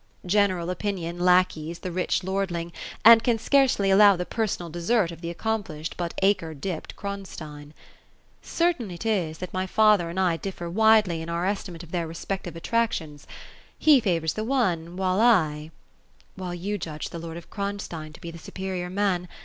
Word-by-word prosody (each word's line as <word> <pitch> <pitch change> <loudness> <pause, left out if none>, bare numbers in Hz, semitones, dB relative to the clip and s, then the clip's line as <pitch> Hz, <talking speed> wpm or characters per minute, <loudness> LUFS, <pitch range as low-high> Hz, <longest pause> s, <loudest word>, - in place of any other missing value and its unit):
General 185 -2 +2
opinion 180 -3 -3
lackeys 175 -2 +2
the 185 - -6
rich 185 +1 0
lord 195 +1 -1
ling, 170 0 -4 0.3
and 230 0 +9
can 235 -2 +2
scarcely 255 -5 +3
allow 200 0 +7
the 180 0 -3
personal 210 -6 -2
desert 175 +3 0
of 165 - -11
the 170 - -4
accomplished, 170 -5 -3
but 175 -1 -4
acre 185 -5 +1
dipped 160 +3 -5
Kronstein. 155 -7 -7 0.7
Certain 335 - 0
it 175 +4 -8
is, 180 -8 0
that 185 +1 -7
my 185 0 -1
father 210 -4 +4
and 175 +3 -4
I 175 -3 +2
dififer 175 -3 -5
wide 220 +1 +5
ly 170 -2 -2
in 160 +1 -6
our 170 +1 -1
estimate 185 -4 -3
of 170 - -13
their 170 -2 -1
respective 175 +1 -5
attractions. 165 -6 -2 0.5
He 300 -3 +6
favours 170 -7 0
the 215 - -3
one 185 -10 0
while 185 0 +1
I 155 -10 +3 0.2
" - - -38
" 60 +1 -33
While 180 -2 -5
you 200 +4 -3
judge 155 -2 -5
the 170 - -6
lord 165 0 -7
of 170 - -12
Kronstein 200 -6 -5
to - - -14
be 170 - -6
the 165 - -10
superior 185 +1 -5
man. 185 -2 0
180 Hz, 180 wpm, -25 LUFS, 170-205 Hz, 0.7 s, and